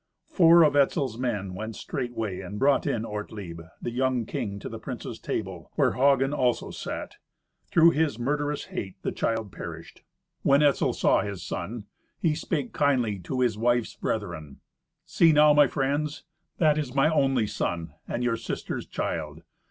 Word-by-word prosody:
Four 170 -2 +6
of 150 -2 +3
Etzel's 135 -4 +2
men 105 -7 -2
went 110 +3 -5
straightway 115 -7 -4
and 95 +2 -7
brought 140 +4 +3
in 115 -1 -1
Ortlieb, 105 -5 -6 0.2
the 120 - -4
young 125 -1 0
king, 100 -2 -4
to - - -7
the - - -7
princes' - - -6
table, - - -4
where - - +3
Hagen 135 +1 +3
also 125 -4 0
sat. - - -6 0.5
Through 170 0 +6
his 150 -7 0
murderous 145 +3 -1
hate 95 -2 -4
the - - -1
child 110 -3 -2
perished. 85 -1 -9 0.4
When 140 +2 +4
Etzel 145 -2 +3
saw - - +3
his 100 -3 -5
son, 110 0 -5 0.3
he 160 -3 +2
spake 150 -2 -3
kindly 125 -8 +1
to 130 +9 -3
his 115 -4 +1
wife's 120 0 +1
brethren, 85 -10 -4 0.4
"See 165 -1 +4
now, 150 0 +6
my 145 -1 +6
friends, 145 +3 -1 0.3
that 155 -2 +3
is 135 -3 -4
my 140 +2 +4
only 135 -7 +2
son, 85 -6 -3
and 120 - -2
your 120 -2 +1
sister's - - -5
child. - - -4
125 Hz, 160 wpm, -27 LUFS, 105-145 Hz, 0.5 s, Four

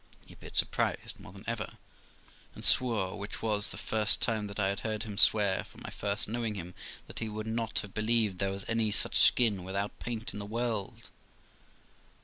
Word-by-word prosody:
He - - -16
appeared - - -12
surprised - - -1
more - - -13
than 100 +1 -13
ever, 115 -2 -4 0.8
and - - -1
swore, 105 -6 +6
which 100 +2 -7
was 105 -2 +1
the - - -7
first 110 -1 0
time 110 -2 -1
that 100 +1 -8
I 95 -1 +2
had 100 0 -3
heard 110 -1 -3
him 105 -3 -7
swear 100 -2 +4
from - - -17
my - - -6
first 100 0 -1
knowing 115 -1 -3
him, 90 -2 -7 0.3
that - - -6
he 115 - -3
could 110 0 -6
not 110 0 -2
have 100 - -11
believed 110 -3 +2
there 100 - 0
was 95 0 -4
any 115 -1 +1
such 105 - +1
skin 105 -7 +4
without 100 +2 -4
paint 115 -3 -5
in 105 - -7
the 100 - -6
world. 115 0 -4
105 Hz, 195 wpm, -29 LUFS, 100-115 Hz, 0.8 s, swore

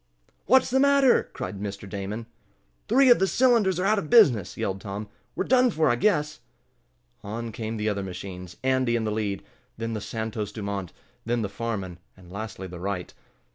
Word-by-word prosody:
"What's 260 +1 +5
the 265 - +3
matter?" 280 -2 +4
cried 100 - -6
Mr. 100 -1 -5
Damon. 100 +3 -5 0.6
"Three 255 +3 +5
of 240 - +6
the 190 - +3
cylinders 225 -7 +3
are 185 - 0
out 215 +1 +3
of 155 - -6
business!" 120 - +5
yelled 95 0 -2
Tom. 100 +1 -5 0.3
"We're - - 0
done 255 0 +4
for, 155 - +2
I - - +2
guess." 150 - +1 0.8
On 115 +3 -5
came 110 0 -4
the 105 0 -2
other 100 -1 -2
machines, 90 -1 -7
Andy 130 -2 +2
in 115 - 0
the 110 - -1
lead, 105 -2 -2 0.3
then 115 0 -3
the 110 - -3
Santos 110 -1 -4
Dumont, 100 -4 -4 0.3
then 115 0 -1
the 100 - -2
Farman, 100 -5 -4 0.2
and 90 -1 -16
lastly 100 -1 -6
the 90 -1 -8
Wright. 95 -1 -4
110 Hz, 180 wpm, -26 LUFS, 100-160 Hz, 0.8 s, of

